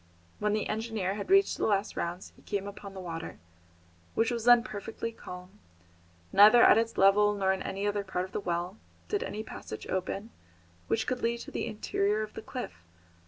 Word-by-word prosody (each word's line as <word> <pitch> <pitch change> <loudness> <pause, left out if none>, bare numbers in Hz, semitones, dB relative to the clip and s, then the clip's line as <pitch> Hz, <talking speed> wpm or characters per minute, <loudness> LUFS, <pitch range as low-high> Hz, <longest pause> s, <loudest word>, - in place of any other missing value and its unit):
When 210 0 +1
the 215 - 0
engineer 215 -3 -2
had 200 0 -6
reached 390 +1 +4
the - - +1
last 200 -1 0
rounds 175 +2 -4
he - - -20
came 200 -1 -3
upon 200 -1 -9
the - - -6
water, 165 -3 -6 0.8
which 225 +2 +2
was 235 -2 -3
then 240 -1 +7
perfectly 225 0 -5
calm. 180 -2 -11 0.7
Neither 215 +4 +8
at - - +7
its 230 0 -2
level 205 +2 +5
nor 190 -1 +2
in 190 - -4
any 195 +1 -3
other 205 0 0
part 185 -1 -2
of 190 - -13
the - - -2
well, 180 +1 -3 0.3
did 410 - 0
any 215 - -4
passage 110 - -8
open 195 +4 -3 0.6
which 115 - 0
could 255 -1 -2
lead 235 0 0
to - - -9
the - - -3
interior 210 0 0
of 215 - -8
the - - -7
cliff. 90 - -7
205 Hz, 195 wpm, -30 LUFS, 190-225 Hz, 0.8 s, Neither